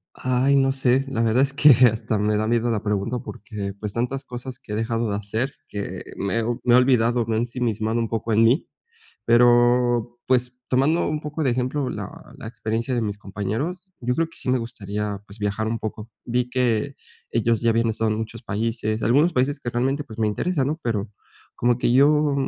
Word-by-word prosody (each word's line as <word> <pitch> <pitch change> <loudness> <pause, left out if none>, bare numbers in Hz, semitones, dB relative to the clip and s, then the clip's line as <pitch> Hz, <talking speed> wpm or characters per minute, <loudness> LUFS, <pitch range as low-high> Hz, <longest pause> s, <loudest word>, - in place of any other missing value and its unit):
Ay, 130 +2 +2
no 135 -1 +3
sé, 130 0 +2
la 130 -4 -2
verdad 115 +3 +3
es 140 0 +1
que 145 +1 +6 0.2
hasta 110 -1 -2
me 105 0 +1
da 110 - 0
miedo 120 +1 +1
la 110 -3 -1
pregunta 105 +3 -1
porque 105 -2 -6
pues 105 -2 -5
tantas 125 +4 -2
cosas 125 0 -8
que 105 - -8
he - - -1
dejado 115 +1 -1
de 100 - -1
hacer 110 +6 -2 0.2
que 100 -1 -5
me 105 +4 0 0.2
me 120 - +4
he - - +8
olvidado, 120 -2 +3
me 115 0 -1
ensimismado 115 -2 -1
un 115 - 0
poco 115 0 -2
en 110 +1 +4
mí, 125 +8 +3 0.6
pero 120 0 +4
pues 125 -1 +1
tomando 140 +7 +2
un 150 0 -2
poco 150 +1 -4
de 130 - +3
ejemplo 130 +3 -1
la - - -5 0.3
la - - -9
experiencia 115 +2 -3
de 120 - 0
mis 105 -1 -3
compañeros. 115 - -4
Yo 125 0 -1
creo 165 0 +1
que 165 - -19
sí - - -3
me 130 - +3
gustaría, 105 -3 -4
pues 100 +2 -12
viajar 105 +1 -1
un 115 - -2
poco. 110 +1 -6
Vi 125 +1 -1
que 125 +1 0 0.3
ellos 115 -1 +1
ya 115 - +2
habían 115 0 +2
estado 110 0 0
en 105 - 0
muchos 110 +2 -6
países 110 +1 -2
algunos 145 +9 +4
países 140 +1 0
que 120 - -4
realmente 135 +4 0
pues 115 -6 -12
me 110 - +2
interesan, 135 - 0
¿no?, 155 +3 -2
pero 110 -3 -1 0.5
como 120 0 +1
que 120 - +1
yo 145 +2 +4
120 Hz, 205 wpm, -23 LUFS, 110-130 Hz, 0.6 s, he